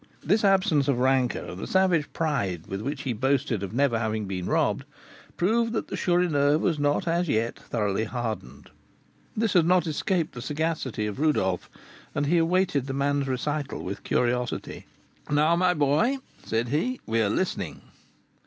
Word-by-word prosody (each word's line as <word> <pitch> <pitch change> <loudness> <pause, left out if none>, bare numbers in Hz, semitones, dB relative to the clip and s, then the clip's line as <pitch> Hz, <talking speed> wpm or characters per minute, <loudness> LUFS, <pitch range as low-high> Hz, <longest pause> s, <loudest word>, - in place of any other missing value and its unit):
This 210 +8 +2
absence 185 -8 +3
of 140 -4 +2
rancour, 130 -1 +1
and 90 +1 -7
the - - -5
savage 185 -5 +2
pride 110 - -1
with 95 +1 -5
which 140 +4 -4
he 130 - -1
boasted 130 -1 0
of 100 - -4
never 125 -1 +2
having 110 -1 -1 0.2
robbed, - - +1 0.5
proved 230 +5 +2
that 225 - -2
the - - -3
Chourineur 155 -5 +2
was 160 -1 0
not 145 +3 +1
as 170 0 +1
yet 115 0 0
thoroughly 105 -2 -1
hardened. 110 - -5 0.7
This 220 -2 +1
had 170 -3 +4
not 180 -1 +4
escaped 165 +2 -1
the 120 - -7
sagacity 150 -6 -2
of 105 +3 -4
Rodolph, 95 - +1 0.5
and 145 - +1
he 170 +4 +3
awaited 165 -5 +1
the 135 - -3
man's 140 0 0
recital 140 +2 -2
with 95 +1 -5
curiosity. 125 0 -1 0.4
"Now, 150 +3 +3
my 180 +1 +2
boy," 150 - +2 0.3
said 115 +1 -1
he, 240 - 0
"we 115 0 +1
are 105 - +2
listening." 185 - -2
145 Hz, 160 wpm, -26 LUFS, 115-170 Hz, 0.7 s, had